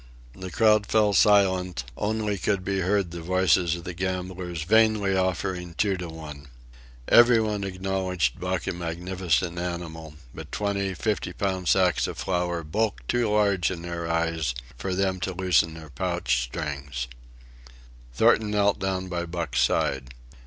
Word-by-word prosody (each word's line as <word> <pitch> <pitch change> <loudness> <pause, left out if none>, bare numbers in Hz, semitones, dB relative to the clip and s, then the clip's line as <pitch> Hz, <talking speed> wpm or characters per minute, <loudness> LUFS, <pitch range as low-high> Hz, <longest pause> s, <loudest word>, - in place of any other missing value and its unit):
The 95 -1 -7
crowd 105 0 +3
fell 105 -2 +3
silent; 95 - +3
only 105 -1 -1
could 95 0 -1
be 95 0 0
heard 95 -1 +1
the 85 0 -6
voices 90 -1 +2
of 85 - -8
the 90 0 -5
gamblers 90 -2 -4
vainly 110 0 +3
offering 95 -2 -2
two 100 +1 +1
to 90 -1 -6
one. 75 -3 -9 0.6
Everybody 110 -4 +5
acknowledged 95 -6 -1
Buck - - -2
a - - -2
magnificent 85 -1 -2
animal, 80 -3 -5 0.2
but - - -9
twenty 100 -2 -1
fifty 110 +1 -2
pound 95 -2 -2
sacks 90 -2 +3
of - - -6
flour 90 -2 -1
bulked 105 +8 -2
too 120 -3 +1
large 100 -5 +2
in 85 -3 -5
their 85 -1 -4
eyes 80 -5 0 0.2
for 95 +8 -3
them 95 -1 0
to 95 +1 -3
loosen 90 -3 +2
their 80 -2 -11
pouch - - 0
strings. 70 -3 -5 1.0
Thornton 110 - +3
knelt 100 -1 +2
down 95 -1 -2
by 85 -1 -3
Buck's 85 -5 -1
side. 65 -1 0
90 Hz, 145 wpm, -26 LUFS, 85-100 Hz, 1.0 s, Everybody